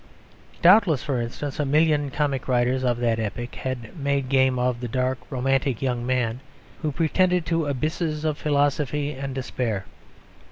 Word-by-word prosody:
Doubtless, 175 - +6
for 130 -4 -1
instance, 135 +5 -5
a - - +2
million 150 0 +2
comic 140 -2 -1
writers 125 +1 +1
of 120 -2 +1
that 115 -2 +1
epoch 115 +3 -4
had 130 -1 -5
made 140 -2 0
game 130 -1 +3
of 125 -1 0
the 120 - -3
dark, 130 +2 -1
romantic 135 -1 0
young 125 -2 -1
man 125 -2 0 0.4
who 155 -2 -1
pretended 180 +3 +2
to 165 -1 0
abysses 155 +2 -2
of 155 -2 +1
philosophy 145 0 +1
and 135 -1 -5
despair. 120 -6 -2
135 Hz, 155 wpm, -24 LUFS, 125-150 Hz, 0.4 s, Doubtless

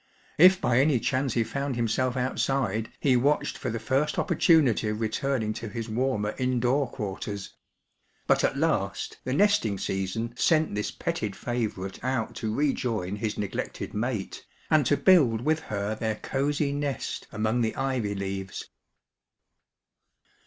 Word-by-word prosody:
If 185 +3 +8
by 120 -7 +2
any 140 -2 +3
chance 130 +2 0
he 115 - +3
found 140 +4 -3
himself 120 +2 0
outside, 125 -4 0
he 135 -3 +3
watched 140 +5 +1
for - - -4
the 115 - -2
first 130 +6 0
opportimity 155 - +3
of 105 0 -3
returning 110 0 -1
to 115 0 -6
his 115 +1 -5
warmer 110 -3 0
indoor 130 +2 +1
quarters^ 100 -2 -5 0.8
But - - +3
at 135 - +1
last 140 -11 -1
the 130 - -2
nesting 150 - +3
season 95 +5 -2
sent 160 - +2
this 105 0 -1
petted 105 -2 -3
&iyourite 105 -5 -4
out 130 -3 -1
to 110 - -2
rejoin 115 -7 -1
his 110 0 -2
nej^ected 100 -2 -4
mate, 110 -2 -3 0.3
and 150 -5 +4
to 145 - +3
build 140 - +5
with 155 +4 +1
her 105 -7 -3
their 110 0 -2
ooey 140 +4 -1
nest 145 -1 -3
among 110 +3 0
the 110 -1 0
ivy 130 -6 -1
leayes. 95 0 -4
120 Hz, 145 wpm, -27 LUFS, 105-140 Hz, 0.8 s, If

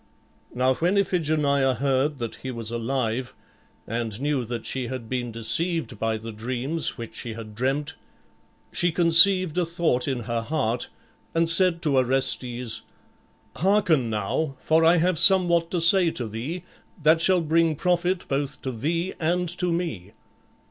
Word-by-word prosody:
Now 130 +1 +2
when 175 +8 0
Iphigenia 150 -8 +1
heard 135 +3 0
that 115 -3 -5
he 130 - -7
was 115 -3 -4
alive 120 +1 -2 0.5
and 115 -1 -4
knew 145 -2 -1
that 115 0 -6
she 130 -2 -3
had 130 -3 -6
been 120 -1 -3
deceived 120 +7 0
by 110 0 -1
the 115 +1 -8
dreams 125 +8 -3
which 115 -2 -8
she 120 - -5
had 110 -2 -9
dreamt, 135 +7 -2 0.8
she 175 0 +1
conceived 175 +1 +4
a - - +2
thought 165 -7 -1
in 130 -3 -2
her 115 0 -3
heart 120 -3 -2 0.5
and 165 0 +2
said 170 0 +3
to 145 -4 +1
Orestes, 125 -2 0 0.8
"Hearken 170 - +2
now, 110 +8 -2
for 160 +3 +2
I 165 +2 +5
have 170 -1 +1
somewhat 175 -3 +5
to 180 - -1
say 170 +1 +5
to 125 -7 -4
thee 130 +12 -5 0.4
that 160 +2 +4
shall 185 +1 +3
bring 165 0 +1
profit 180 +2 0
both 140 0 -3
to 130 - -3
thee 165 +10 -2
and 175 +2 0
to 180 -1 0
me. 110 - -4
140 Hz, 155 wpm, -24 LUFS, 120-170 Hz, 0.8 s, I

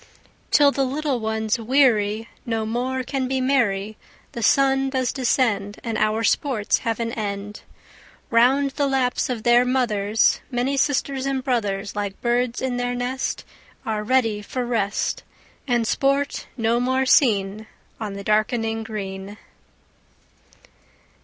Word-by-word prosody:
Till 285 -1 +5
the 275 - 0
little 275 0 -1
ones, 220 +1 -1
weary, 225 -3 +2 0.2
No 225 -2 -2
more 255 +3 -2
can 260 +1 -2
be 265 0 -1
merry: 220 -6 0 0.3
The 235 - -6
sun 270 +3 +3
does 260 -2 -1
descend, 225 -6 0
And 230 -2 -3
our 215 +1 +1
sports 225 -2 +1
have 230 -2 -2
an 230 0 -2
end. 205 -2 -5 0.7
Round 265 +4 +4
the 285 +1 0
laps 265 -2 0
of 235 -4 -3
their 240 +1 +5
mothers 225 -5 +2
Many 255 +2 -1
sisters 275 -1 0
and 270 -1 -1
brothers, 205 -6 -1
Like 205 -1 -4
birds 240 +1 0
in 255 -2 -1
their 245 0 -1
nest, 250 +2 -3 0.4
Are 215 -1 -2
ready 225 -3 +1
for 250 +4 -4
rest, 215 -4 -1 0.5
And 240 -2 +1
sport 275 +4 0
no 230 0 +1
more 260 +2 +1
seen 215 -5 +2 0.3
On 215 -3 -4
the 200 0 -7
darkening 225 +2 0
green. 200 -2 -6
240 Hz, 135 wpm, -23 LUFS, 215-260 Hz, 0.7 s, Till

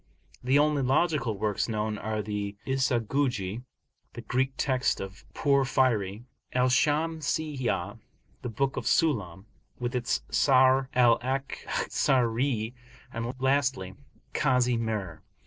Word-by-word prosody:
The 130 +3 +3
only 150 -1 +3
logical 130 - +1
works 105 +2 -1
known 105 -1 -2
are 110 0 -3
the 105 -1 -4
Isaghuji 125 -5 0 0.5
(the - - -7
[Greek 130 +2 -1
text] 130 -2 +1
of 95 +3 -8
Porphyry), 130 -7 +1 0.3
Al 125 0 +3
Shamsiyah, 155 -1 0 0.4
the 125 - -4
book 135 +4 -1
Al - - 0
Sullam, 100 - 0 0.3
with 120 +1 -3
its 120 -1 -1
Sharh 130 -1 +4
Al 120 -2 +5
Akhzari, 125 -2 -1 0.4
and, 115 +1 -3
lastly, 130 -8 +1 0.4
Kazi 125 -4 +2
Mir. 105 -8 -3
125 Hz, 110 wpm, -28 LUFS, 110-135 Hz, 0.5 s, Al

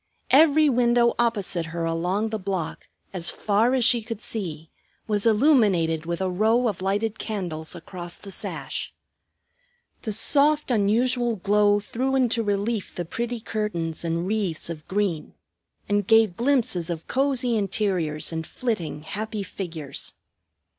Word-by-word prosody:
Every 305 +2 +6
window 240 -2 +3
opposite 200 -8 +1
her 165 +1 -3
along 180 +6 -1
the 220 0 -3
block, 190 -4 -4 0.2
as 175 -2 +3
far 220 +8 +2
as 250 -3 +2
she 235 0 +4
could 225 -1 -6
see, 165 -9 -5 0.4
was 210 0 +1
illuminated 205 - +3
with 170 +1 -2
a 190 - +1
row 220 +6 +2
of 195 -5 -3
lighted 205 +3 -1
candles 175 -7 -4
across 175 0 -7
the 200 - -11
sash. - - -4 1.1
The 220 - -3
soft, 290 +6 +3
unusual 235 +2 +2
glow 205 +1 +3
threw 255 +6 -2
into 240 -3 +2
relief 205 0 -2
the 175 - -3
pretty 235 +7 -3
curtains 175 -9 -3
and 170 +1 -1
wreaths 190 -6 -2
of 155 -2 -9
green, 190 -5 -2 0.5
and 205 -1 0
gave 225 -5 +5
glimpses 235 - +1
of 165 -1 -5
cosy 260 -3 +1
interiors 185 -7 0
and 160 0 -4
flitting 175 -11 -3
happy 210 +5 -4
figures. 165 -7 -5
205 Hz, 140 wpm, -24 LUFS, 175-235 Hz, 1.1 s, Every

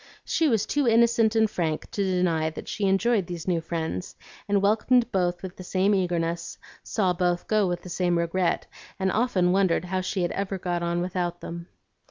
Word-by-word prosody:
She 325 - +1
was 225 -5 +2
too 290 -3 0
innocent 230 -1 +4
and 220 0 +4
frank 165 -6 -3
to 200 - -1
deny 180 -4 +1
that 160 - -9
she 205 - -2
enjoyed 195 0 +2
these 175 -1 -6
new 170 -3 +1
friends, 160 - -4 0.3
and 200 0 +3
welcomed 225 +4 +2
both 175 -1 0
with 185 -1 -6
the 185 - -8
same 190 +3 +1
eagerness, 170 -3 -1 0.2
saw 190 -5 0
both 175 0 0
go 215 -3 +2
with 175 -1 -3
the 180 - -9
same 175 -1 +1
regret, 170 +1 0 0.3
and 190 -1 0
often 200 -6 +2
wondered 185 -2 +2
how 185 +1 -1
she 185 -1 -1
ever 195 +2 -2
had 185 - -8
got 175 -1 -1
on 170 0 -1
without 175 -1 -2
them. 170 0 -7
185 Hz, 195 wpm, -26 LUFS, 175-200 Hz, 0.3 s, innocent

